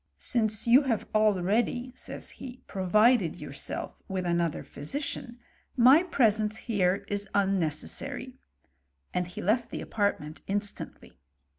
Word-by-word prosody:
" - - -48 0.2
Since 220 -3 +1
you 240 +4 +7
have 230 -5 -1
already," 215 +4 +2
says - - -6
he, 255 -1 -10
*' - - -42
provided 210 0 +3
yourself - - -6
with 190 -2 -3
another 170 -2 0
physician, 245 - -5 0.4
my 260 +6 +7
presence 220 - +2
here 195 -4 0
is 205 -1 -3
un 195 -1 +3
necessary," 250 - -3 0.7
and 180 -1 0
he 180 - -7
left 230 +5 +1
the - - -5
apartment 200 -7 -2
instantly. 205 - -5
215 Hz, 130 wpm, -28 LUFS, 190-245 Hz, 0.7 s, you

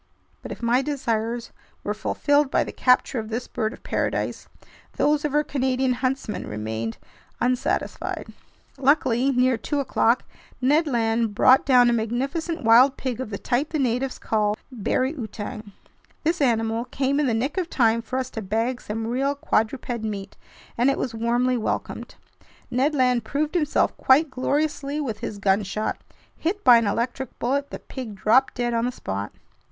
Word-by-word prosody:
But - - -8
if - - -8
my 240 +2 +3
desires 235 -5 -2 0.3
were 210 - -1
fulfilled 285 +6 +1
by - - +2
the - - -7
capture 250 0 +2
of 220 -1 -6
this 230 +3 -3
bird 220 -1 -2
of - - -13
paradise, - - -2 0.5
those 295 0 +2
of 295 -1 -1
our 300 - +4
Canadian 260 -2 0
huntsman 255 -3 -2
remained 110 +2 -4 0.4
unsatisfied. 250 0 -1 0.5
Luckily, 265 -2 +3
near 250 -1 +3
two 285 +6 -2
o'clock 250 -3 +2 0.4
Ned 295 +6 +3
Land 225 -4 0
brought 260 +5 +5
down 250 -2 +6
a 240 - +3
magnificent 275 +9 -2
wild 245 +4 +6
pig 255 -2 -3
of 260 - -5
the 200 - -4
type 255 +8 -1
the 315 - -2
natives 255 -1 0
call 210 -1 0
"bari 255 +4 0
outang." 215 -4 -7 0.5
This 330 +1 0
animal 225 -2 +1
came 275 +2 0
in 295 - +2
the 230 - +1
nick 270 +10 -1
of 350 -2 -3
time 230 -5 +2
for 255 +3 -4
us 260 -1 -3
to 220 - -5
bag 225 +5 -1
some 220 +1 -4
real 270 +5 0
quadruped 240 -2 -1
meat, 205 -3 -5 0.4
and 250 +3 +4
it 275 - +1
was 245 - -3
warmly 240 +3 +1
welcomed. 220 - -4 0.6
Ned 270 +5 +1
Land 250 -3 +2
proved 295 +8 -2
himself 310 -4 +1
quite 285 +3 +4
gloriously 285 +2 -1
with 230 -8 -3
his 205 - -5
gunshot. 200 +2 0 0.3
Hit 400 +6 -2
by 245 -1 +8
an 230 - -1
electric 245 +5 -2
bullet, 280 +3 -1
the - - -6
pig 245 -6 -8
dropped 225 +7 +3
dead 240 -1 -1
on 230 0 +1
the 250 - 0
spot. 100 - -5
250 Hz, 170 wpm, -24 LUFS, 225-275 Hz, 0.6 s, by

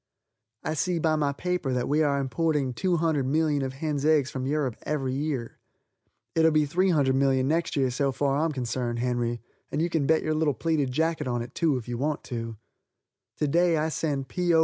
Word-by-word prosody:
I - - -1
see 175 +3 0
by 160 -1 +2
my 145 -2 +1
paper 175 -2 -2
that 125 -1 0
we 150 +2 +2
are 140 -2 +2
importing 140 -1 0
200,000,000 155 -2 +1
of 130 -1 -3
hens' 145 0 -2
eggs 150 -3 +3
from 130 -1 -3
Europe 140 -5 0
every 135 -4 -2
year. 135 -4 -3 0.7
It'll 160 0 +4
be 155 -1 +3
300,000,000 140 -6 +2
next 165 +3 0
year 135 -3 +2
so 135 +2 0
far 140 +1 0
as 160 - +2
I'm 165 - 0
concerned, 125 -2 -2
Henry, 120 -1 -1 0.3
and 145 - -1
you 170 +1 0
can 155 -4 +1
bet 160 0 +3
your 155 - 0
little 155 -3 +1
pleated 155 -5 0
jacket 160 +1 0
on 120 -1 -1
it, 120 - -11
too, 160 -6 +1
if 125 - -7
you 120 -1 -4
want 150 +2 -1
to. 115 -3 -5 0.8
To 150 - 0
day 170 +2 +3
I 155 +1 0
send 145 -4 -2
P. 180 +4 0
O. - - +6
145 Hz, 200 wpm, -27 LUFS, 130-160 Hz, 0.8 s, O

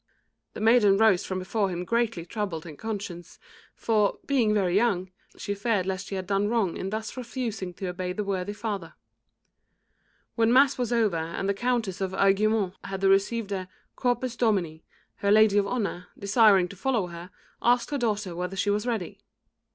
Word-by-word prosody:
The - - -7
maiden 220 -3 +5
rose 215 -4 +3
from 185 - -3
before 195 +2 -1
him 180 0 -4
greatly 230 -5 0
troubled 180 -4 -4
in 160 -3 -9
conscience, 200 -4 -6 0.4
for, 210 -3 +1
being 250 -6 +2
very 190 -4 +1
young, 195 -4 +1 0.3
she 205 - -3
feared 205 -2 0
lest 190 0 -3
she 195 - -4
had 190 -1 -4
done 200 +2 +1
wrong 215 -6 0
in 190 - -4
thus 220 +1 -4
refusing 235 -6 -4
to 190 - -6
obey 180 0 -4
the 210 +3 -3
worthy 195 0 -2
father. 205 -6 -5 1.4
When 230 0 +2
mass 270 +2 +5
was 245 -1 -1
over 220 -7 +2
and 165 +4 -3
the 200 - +2
Countess 225 -3 -1
of 190 -1 -2
Aiguemont 195 0 +2
had 195 0 -5
received 200 +3 +2
the 190 -2 -3 0.3
"Corpus 245 -1 -1
Domini," 190 -9 0 0.3
her 200 - -1
lady 210 -1 +5
of 200 - 0
honour, 200 -6 -3
desiring 200 -2 +4
to 200 - -10
follow 230 0 0
her, 170 0 -9 0.3
asked 240 +2 +2
her 285 - -1
daughter 210 -6 -1
whether 180 +2 -4
she 205 +2 +1
was 210 +3 -1
ready. 220 -8 -3
200 Hz, 175 wpm, -26 LUFS, 185-225 Hz, 1.4 s, maiden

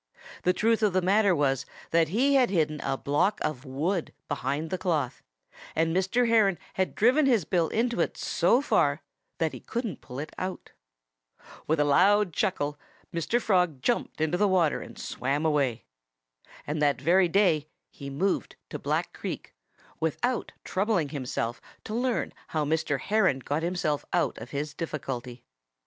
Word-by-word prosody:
The 180 - +3
truth 225 +4 +2
of 210 -4 +3
the 185 - +3
matter 200 0 +4
was 135 -3 +1 0.3
that 165 -1 +4
he 250 - +2
had 260 -3 +4
hidden 155 -5 +1
a 135 0 -1
block 145 +11 +1
of 150 -3 -3
wood 160 +7 -1 0.2
behind 145 +3 -2
the 185 - 0
cloth, 150 -8 -1 0.5
and 165 +1 +1
Mr. 190 +6 +2
Heron 215 -5 +4 0.2
had 190 -1 -1
driven 260 +6 +4
his 230 - +3
bill 170 0 +1
into 235 +5 0
it - - -1
so 255 +4 +2
far 145 - +2 0.3
that 160 -2 0
he - - -7
couldn't 230 - -4
pull 125 -1 -9
it 150 +3 -5
out. 185 0 -5 1.0
With 160 0 +1
a - - +5
loud 190 +5 +4
chuckle 145 -6 -1 0.3
Mr. 170 +8 0
Frog 180 - +1
jumped 240 - 0
into 160 +3 0
the 205 - +4
water 180 -5 +2
and - - -10
swam 140 +5 -2
away. 140 -7 +1 0.8
And 150 +1 -2
that 145 -2 +2
very 175 +6 +4
day 170 -5 +2 0.2
he 140 -1 -8
moved 180 +8 -1 0.2
to - - -4
Black - - -1
Creek, - - -6 0.5
without 240 - -1
troubling 190 -6 0
himself 125 -4 -3 0.2
to 215 - -6
learn 245 +1 0
how 155 -2 -1
Mr. 155 -2 0
Heron 200 -5 +2
got 145 +4 -2
himself 165 -4 -1
out 175 - +1
of - - -9
his 150 +1 -3
difficulty. 130 -6 -5
165 Hz, 160 wpm, -27 LUFS, 145-200 Hz, 1.0 s, a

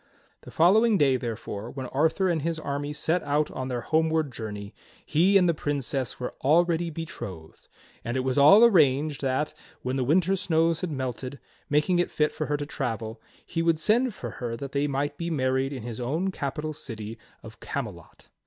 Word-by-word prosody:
The - - -12
following 210 +6 +4
day, 140 -5 +4
therefore, 115 -3 -5
when 130 +1 -6
Arthur 160 +8 +1
and 170 -4 +1
his 165 +2 -1
army 145 -1 -3
set 160 +4 0
out 150 +1 0
on 130 - -4
their 125 -2 -2
homeward 160 0 +1
journey, 105 -3 -6 0.3
he 180 +6 +4
and 180 -2 +4
the 170 - +3
Princess 140 -4 -2
were 125 - -4
already 170 +3 +3
betrothed; 100 - -8 0.4
and 120 +3 -2
it - - +1
was 130 0 -1
all 195 +11 +8
arranged 150 - +3
that, 135 +2 0 0.3
when 130 +1 -1
the 130 - +1
winter 180 +8 +3
snows 165 -3 +1
had 180 - -2
melted, 130 -1 -4 0.3
making 150 +5 +2
it 175 - +1
fit 150 0 +1
for 155 - -4
her 145 - 0
to 145 - -4
travel, 115 -6 -4 0.2
he 165 - -2
would 165 -1 +2
send 220 +7 +2
for 120 - -6
her 115 +2 -5
that 135 +2 -6
they 140 +1 0
might 145 +1 -2
be 170 0 -2
married 130 -3 0
in 130 -5 -6
his 120 -1 -6
own 160 +10 -1
capital 150 -1 -4
city 115 -5 -7 0.2
of - - -12
Camelot. - - -6
145 Hz, 190 wpm, -26 LUFS, 130-165 Hz, 0.4 s, all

